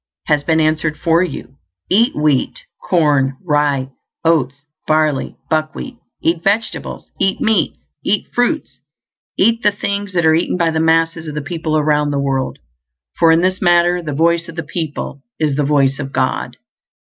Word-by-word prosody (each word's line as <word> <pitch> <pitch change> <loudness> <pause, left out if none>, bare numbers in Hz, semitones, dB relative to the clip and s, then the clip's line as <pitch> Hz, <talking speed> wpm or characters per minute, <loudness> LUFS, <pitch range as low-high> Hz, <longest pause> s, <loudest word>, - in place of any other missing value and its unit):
has 150 -2 +1
been 160 +2 +2
answered 155 -1 +1
for 165 0 +2
you. 135 -7 -5 0.3
Eat 230 +7 +3
wheat, 150 -3 0 0.2
corn, 145 -6 +2
rye, 145 -4 +1 0.3
oats, 140 -4 +1 0.2
barley, 155 -3 +1
buckwheat; 155 - -2 0.3
eat 165 0 +1
vegetables; 215 +3 -2
eat 195 - +1
meats, 220 -3 +1 0.3
eat 205 - 0
fruits, 245 +6 -1 0.6
eat 230 0 +3
the 210 - +3
things 200 -1 -3
that 170 -2 +1
are 160 - +5
eaten 170 +2 +1
by 170 -2 +2
the 160 - -1
masses 165 0 +1
of 150 - -6
the - - -1
people 160 0 -2
around 150 -1 +2
the 145 - -1
world, 135 -1 -1 0.6
for 165 -1 +6
in 165 +1 +4
this 185 +1 0
matter 175 0 +3
the 155 -3 -5
voice 170 +3 +1
of 165 - -9
the 165 - -3
people 150 -3 -5 0.2
is 150 -3 +1
the 145 - +1
voice 140 -1 +2
of 135 -1 -5
God. - - -1
160 Hz, 165 wpm, -17 LUFS, 150-175 Hz, 0.6 s, for